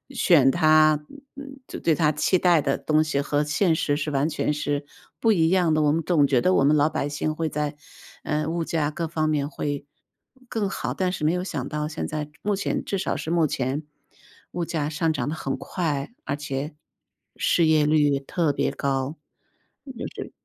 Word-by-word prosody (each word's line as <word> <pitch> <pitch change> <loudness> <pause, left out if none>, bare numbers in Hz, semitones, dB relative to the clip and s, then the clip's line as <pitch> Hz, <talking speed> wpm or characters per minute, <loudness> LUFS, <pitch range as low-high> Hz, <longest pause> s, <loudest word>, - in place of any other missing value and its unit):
选 150 - +5
他 155 0 +4 0.3
嗯， 275 -1 -10
就 - - -7
对 165 - +3
他 155 -2 +2
期 165 +5 +2
待 175 -4 +4
的 135 -1 0
东 155 0 +2
西 150 -3 -1
和 145 +1 0
现 160 +3 +2
实 145 -2 0
是 150 0 -2
完 145 +2 +1
全 150 -1 -1
是 145 -1 -2 0.3
不 225 -1 +4
一 165 -4 +3
样 175 -3 +3
的。 155 - +2
我 150 -1 +3
们 160 +2 +1
总 155 -3 +3
觉 130 -3 +3
得 185 +9 +2
我 135 - +4
们 150 +2 +4
老 145 - +4
百 145 -2 -2
姓 155 +1 -2
会 160 0 -1
在 150 0 -2 0.5
呃， 150 0 -1
物 165 +1 -1
价 160 -2 0
各 165 +2 -3
方 155 -1 -1
面 145 -2 0
会 145 -2 -4 0.6
更 215 -4 -1
好， - - -3
但 185 -1 0
是 155 -5 -3
没 160 - +3
有 180 0 -1
想 140 -8 -4
到 150 0 -3
现 155 - -4
在， 150 -1 -4
目 205 0 0
前 195 - -1
至 200 - -1
少 185 - -2
是 - - -5
目 165 -1 +3
前 135 +1 -2 0.7
物 175 - -2
价 160 -3 -2
上 160 +1 0
涨 135 -3 -2
得 155 - -3
很 135 -3 -3
快， 155 0 -3
而 - - -2
且， 145 +1 -4 0.7
失 170 - +3
业 155 -1 +4
率 145 -2 +3
特 155 +3 0
别 140 - 0
高， 135 +1 -2 0.8
就 - - -4
是 - - -7
155 Hz, 220 characters per minute, -24 LUFS, 145-165 Hz, 0.8 s, 选